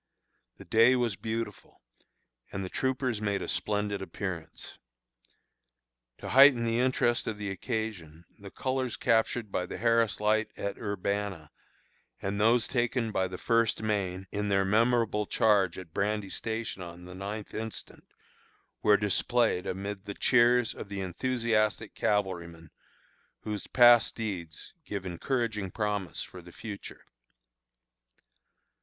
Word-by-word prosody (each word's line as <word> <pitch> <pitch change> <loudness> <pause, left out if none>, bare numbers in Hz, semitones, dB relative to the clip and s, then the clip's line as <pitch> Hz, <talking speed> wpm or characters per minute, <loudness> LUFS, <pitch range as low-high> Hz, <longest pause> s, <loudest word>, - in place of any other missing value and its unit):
The - - -12
day 115 +3 +5
was 120 -5 0
beautiful, 115 +3 -5 0.7
and 95 -1 -3
the - - -6
troopers 130 -3 -1
made 100 -2 -1
a - - -5
splendid 105 -1 -1
appearance. 95 -4 -6 1.4
To - - -7
heighten 135 -3 +7
the 115 +1 +1
interest 125 -2 +1
of 110 - -2
the 105 -1 -4
occasion, 95 -6 -4
the 100 -1 -9
colors 130 +1 -2
captured 115 -2 +1
by 90 -1 -1
the - - -6
Harris 115 -1 +2
Light 110 +1 +2
at 100 0 -4
Urbanna, 100 -5 -3 0.7
and 100 +1 -2
those 115 +2 +4
taken 120 -2 0
by 95 -2 0
the 90 0 -7
First 115 0 +1
Maine 95 -3 -1
in 105 0 -2
their 95 -1 +2
memorable 110 0 +2
charge 100 -5 +3
at 90 -4 -10
Brandy 100 -1 -1
Station 110 -3 -4
on 85 0 -9
the 90 +1 -10
ninth 100 +3 -6
instant, 110 0 -6 0.8
were 105 -1 +5
displayed 105 0 +1
amid 100 +1 -4
the 100 -1 -6
cheers 120 -1 +4
of 100 - -8
the 100 -1 -4
enthusiastic 110 +3 0
cavalrymen, 85 -5 -2 0.7
whose 105 -2 -5
past 120 -2 +6
deeds 90 -8 -5
give 100 -8 -5
encouraging 105 +2 -2
promise 105 -2 -2
for 90 - -11
the 90 0 -14
future. 105 +1 -9
105 Hz, 130 wpm, -29 LUFS, 95-115 Hz, 1.4 s, heighten